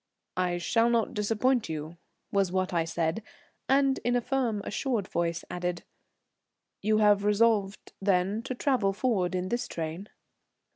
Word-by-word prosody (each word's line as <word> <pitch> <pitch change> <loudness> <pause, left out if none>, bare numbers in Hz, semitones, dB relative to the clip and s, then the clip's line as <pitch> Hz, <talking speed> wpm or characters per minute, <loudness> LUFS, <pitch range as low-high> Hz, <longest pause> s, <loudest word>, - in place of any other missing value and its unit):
"I 180 -1 +1
shall 230 +7 +2
not 230 -2 +1
disappoint 225 +2 +1
you," 155 +1 -5 0.4
was 195 -3 +1
what 185 0 -1
I 165 -1 +1
said, 165 +4 -1 0.5
and, 270 0 +3
in 245 0 +1
a - - +4
firm 235 -6 -1
assured 230 -5 -1
voice, 170 -1 -1
added, 180 -1 -3 1.0
"You 215 +1 +2
have 205 -1 +4
resolved 210 -1 +1
then 195 +2 +1
to 255 - -3
travel 245 -7 +1
forward 195 -5 0
in 180 0 -2
this 240 +2 -1
train?" 165 +5 -5
205 Hz, 145 wpm, -28 LUFS, 180-230 Hz, 1.0 s, a